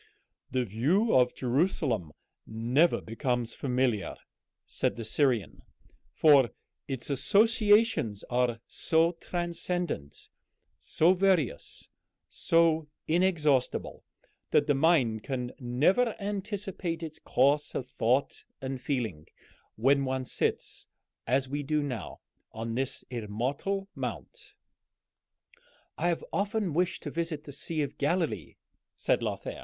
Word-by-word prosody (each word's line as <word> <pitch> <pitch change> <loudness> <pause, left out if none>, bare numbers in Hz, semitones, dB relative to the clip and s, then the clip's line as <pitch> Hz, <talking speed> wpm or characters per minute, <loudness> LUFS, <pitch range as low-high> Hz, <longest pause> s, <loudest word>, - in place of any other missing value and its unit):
"The 130 -1 0
view 150 - +1
of 125 -1 +4
Jerusalem 125 - 0 0.4
never 120 +9 +2
becomes 120 0 -2
familiar," 125 - 0 0.5
said - - -1
the 115 - -6
Syrian; 120 - 0 0.5
"for 140 - +5 0.4
its 135 0 -4
associations 210 - +3
are 120 -2 0
so 165 +1 +2
transcendent, 175 - -4 0.5
so 170 +4 +3
various, 180 - 0 0.4
so 165 -2 +2 0.2
inexhaustible, 155 -6 +1 0.5
that 145 - +3
the 145 - +3
mind 135 -7 +3
can 125 0 -4
never 170 - +2
anticipate 195 -4 -4
its 160 -1 -7
course 145 +3 +2
of 130 - -2
thought 130 +3 0
and 130 -1 -5
feeling, 115 - -3 0.5
when 135 +5 +3
one 130 -1 -2
sits, - - -2 0.4
as 130 +2 +2
we 145 +2 -3
do 150 +1 0
now, 125 - -5 0.3
on 115 +1 -5
this 130 +2 -1
immortal 130 - -2
mount."... 425 -3 -7 1.4
"I 175 - -1
have 170 -2 -1
often 205 -3 0
wished 180 +3 0
to 145 - -4
visit 165 -2 -3
the 145 - -9
Sea 155 +2 -2
of 140 - -6
Galilee," 165 +3 -1 0.4
said - - +1
Lothair. - - -4
145 Hz, 110 wpm, -29 LUFS, 125-175 Hz, 1.4 s, for